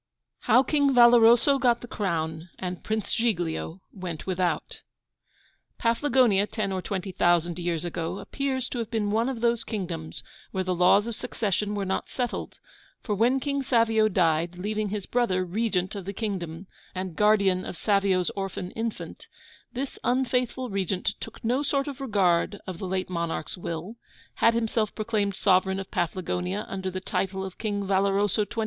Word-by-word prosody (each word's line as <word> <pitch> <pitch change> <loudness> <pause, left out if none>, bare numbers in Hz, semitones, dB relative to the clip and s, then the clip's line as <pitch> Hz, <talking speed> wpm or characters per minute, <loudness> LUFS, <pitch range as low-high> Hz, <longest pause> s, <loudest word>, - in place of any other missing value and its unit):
II. - - -42
HOW 255 - +7
KING 285 -2 +2
VALOROSO 240 +3 +7
GOT 240 -3 +3
THE 245 - -8
CROWN, 165 -5 -2
AND 180 -1 -5
PRINCE 220 -1 -2
GIGLIO 180 -6 -1
WENT 180 -5 -6
WITHOUT 185 -1 -1 1.0
Paflagonia, 230 -4 +3
ten 210 -4 -2
or 190 -1 -2
twenty 190 0 -4
thousand 175 0 +2
years 175 -1 -1
ago, 170 +1 -3
appears 260 +5 -2
to 245 - -4
have 230 - -3
been 215 -3 -1
one 225 +4 +2
of 245 -4 -4
those 235 -1 +2
kingdoms 175 -8 -5 0.3
where 190 - -2
the 185 0 0
laws 180 +4 +5
of 235 -1 -4
succession 210 -3 -2
were 200 -1 -1
not 190 - -2
settled; 245 -2 -3 0.5
for 210 - -1
when 240 +6 +3
King 280 +1 -1
Savio 230 -4 +3
died, 170 -3 +1
leaving 210 +2 -2
his 205 -1 -3
brother 190 -7 +1
Regent 190 -1 -1
of 200 -3 -6
the 200 - -4
kingdom, 185 -5 -4 0.3
and 185 -2 -4
guardian 200 -3 +3
of - - -6
Savio's 195 -3 +2
orphan 195 -2 -4
infant, 225 0 -5 0.5
this 270 +2 -4
unfaithful 250 -1 0
regent 195 0 -1
took - - -9
no 250 +5 +2
sort 275 -1 0
of 280 -1 -6
regard 200 -5 +2
of 185 -3 -6
the 190 - -4
late 185 0 -2
monarch's 170 -3 -2
will; 175 +5 -5 0.4
had 230 0 +4
himself 225 -2 0
proclaimed 210 -3 0
sovereign 190 0 +3
of 195 - -7
Paflagonia 180 +3 -2
under 190 -1 -3
the 185 0 -5
title 190 0 -2
of 190 - -9
King 205 -2 -1
Valoroso 200 +1 +2
XXIV. 230 +2 -6
200 Hz, 165 wpm, -26 LUFS, 185-230 Hz, 1.0 s, HOW